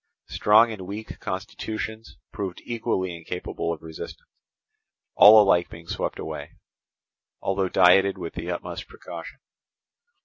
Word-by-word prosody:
Strong 110 +2 +5
and 95 -4 -7
weak 105 +3 -7
constitutions 110 +3 -5
proved 95 -3 -5
equally 110 -6 -2
incapable 85 0 -4
of 80 -2 -6
resistance, 80 -1 -9 0.9
all 110 +1 +9
alike 95 -4 +4
being 85 0 -11
swept - - -3
away, - - -6 0.9
although 95 -1 -1
dieted 95 +2 +5
with 85 -3 -6
the 85 +1 -5
utmost 85 - -5
precaution. - - -9
95 Hz, 115 wpm, -25 LUFS, 85-105 Hz, 0.9 s, all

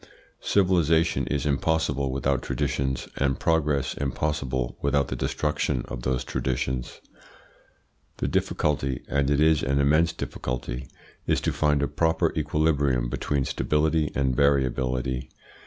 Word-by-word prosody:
Civilisation 85 -4 +2
is 75 0 -1
impossible 70 -2 0
without 70 0 0
traditions, 65 -1 -2
and 70 -1 0
progress 75 -4 +1
impossible 65 -3 -2
without 70 0 +1
the - - -2
destruction 75 -4 -1
of - - -6
those 65 0 -1
traditions. 65 -1 -3 1.2
The - - -1
difficulty, 70 -4 0
and 70 -1 +1
it 70 -1 +2
is 80 0 +4
an 70 +2 0
immense 75 +4 +3
difficulty, 60 +1 -5 0.4
is - - +2
to - - 0
find 75 -2 +2
a - - +1
proper 80 -1 +1
equilibrium 70 -5 +1
between 70 +2 -1
stability 75 0 +1
and 65 -2 +1
variability. 65 -2 +1
70 Hz, 125 wpm, -26 LUFS, 65-75 Hz, 1.2 s, is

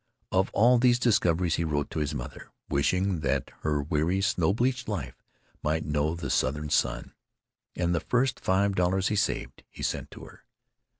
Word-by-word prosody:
Of 95 +1 +2
all 120 +3 +5
these 120 0 +4
discoveries 90 -8 +2
he 85 - 0
wrote 75 -3 -2
to - - -3
his 75 -1 -2
mother, - - -7 0.2
wishing 90 +6 +1
that 70 -3 -1
her 75 -2 0
weary 80 +5 0
snow 90 -2 +2
bleached 125 +3 0
life 75 - -5 0.4
might 80 +1 -1
know 75 +2 0
the 85 - -4
Southern 75 +3 0
sun. - - 0 0.6
And 85 -1 0
the 85 - +1
first 125 +5 0
five 100 +2 +1
dollars 95 +1 +1
he 105 - 0
saved 95 - -2
he - - -10
sent - - -2
to - - -12
her. - - -14
85 Hz, 175 wpm, -27 LUFS, 75-100 Hz, 0.6 s, all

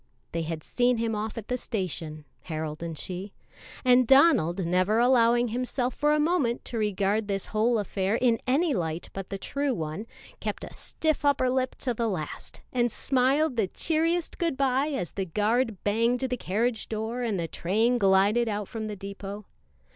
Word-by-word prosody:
They 165 - -2
had 160 -1 -4
seen 245 0 +1
him 225 0 -1
off 215 +1 -3
at 220 - -6
the 250 0 -1
station 165 - -4 0.2
Harold 155 -2 -4
and 165 -2 -5
she 185 +5 -6 0.5
and 250 -1 +5
Donald, 200 - +5
never 185 +5 +2
allowing 240 -1 +4
himself 250 +1 -1
for 295 +1 +1
a 300 - +3
moment 295 -7 +1
to 230 - -4
regard 205 0 0
this 195 -1 -2
whole 225 +2 +3
affair 200 0 -1
in 235 -1 +2
any 290 +5 +2
light 165 -3 -3
but 195 -1 -6
the 195 - -3
true 280 +5 -1
one, 160 +5 -4 0.3
kept - - -4
a - - -8
stiff 310 -2 -1
upper 275 -3 +3
lip 260 0 0
to 250 - -2
the 230 0 -1
last, 160 -7 -6
and 240 -2 +2
smiled 270 +3 +1
the 215 -4 +2
cheeriest 330 - 0
good 335 -6 0
by 270 +1 +2
as 270 - -3
the 195 - -3
guard 215 +4 0
banged 230 +4 +1
the 255 -1 0
carriage 225 +2 -1
door 225 +3 -3
and 220 -6 -1
the 165 - -2
train 220 +10 +1
glided 200 +4 +3
out 205 -1 -3
from 220 -1 -5
the 210 - -5
depot. 200 +1 -7
225 Hz, 180 wpm, -27 LUFS, 195-255 Hz, 0.5 s, and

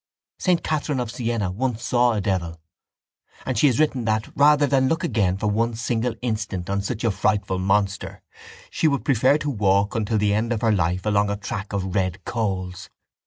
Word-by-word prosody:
Saint 180 -3 +1
Catherine 150 -3 -1
of 120 -2 -3
Siena 115 -6 -2
once 120 +3 -2
saw 120 +1 +2
a 105 - -1
devil 85 -5 -2 0.9
and 130 - -2
she 115 - +4
has 125 - +2
written 140 -5 +1
that, 110 -1 -1
rather 145 0 +5
than 135 -1 +2
look 165 +5 0
again 105 - +1
for 105 - -4
one 115 +2 0
single 120 0 -1
instant 105 -6 -3
on 100 0 0
such 110 +3 -4
a 115 - +2
frightful 95 -1 0
monster, 100 +1 -1 0.5
she 160 - +1
would 140 -2 0
prefer 135 +2 +3
to 150 -1 -3
walk 100 -3 +2
until 110 0 0
the 105 -1 +2
end 110 +3 0
of 115 -3 -1
her 115 - +3
life 90 -1 0
along 105 -1 +2
a 100 - -2
track 105 -1 -5
of 95 -2 -3
red 95 -2 -1
coals. 95 -5 -3
110 Hz, 195 wpm, -23 LUFS, 100-125 Hz, 0.9 s, rather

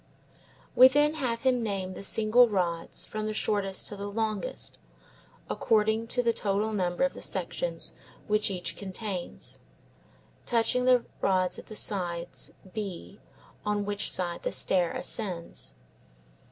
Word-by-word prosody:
We 255 - +10
then 295 +3 +3
have 245 -7 -2
him 255 -2 +3
name 195 -4 -2
the - - -8
single 225 +4 +5
rods 175 -4 -1
from 215 0 -4
the 215 - -3
shortest 200 -3 0
to 205 - -5
the 200 0 -5
longest, 215 -1 -2 0.7
according 220 0 +2
to 245 +1 +1
the 230 -1 +3
total 210 +1 0
number 180 +1 0
of 275 - +2
the - - -9
sections - - -2 0.3
which 210 0 +2
each 180 -2 -3
contains, 190 - -5 0.8
touching 245 +2 +2
the 250 -2 +5 0.2
rods 185 -2 +2
at - - -12
the 215 - -9
sides 175 -5 -1 0.2
B, 200 -2 -5 0.4
on 210 -1 0
which 205 0 -1
side 175 -2 -1
the - - -2
stair 180 -3 +2
ascends. 180 - -4
210 Hz, 140 wpm, -29 LUFS, 185-230 Hz, 0.8 s, We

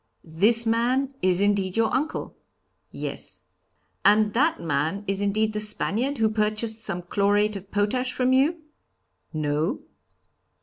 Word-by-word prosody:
'This 210 +9 +2
man 250 +4 +1
is 185 0 +2
indeed 200 -1 +1
your 225 0 +2
uncle?' 290 +5 -2 0.5
'Yes.' - - -5 0.6
'And 210 0 +4
that 295 +7 +2
man 165 +5 -1
is 195 0 -1
indeed 215 +2 0
the 210 - -2
Spaniard 215 +5 0
who 225 -1 +3
purchased 215 +1 -1
some 180 -4 -2
chlorate 205 +3 +1
of 195 0 -8
potash 230 +6 0
from 255 +1 +1
you?' 310 +5 +2 0.7
'No.' 155 - -1
210 Hz, 130 wpm, -25 LUFS, 195-235 Hz, 0.7 s, And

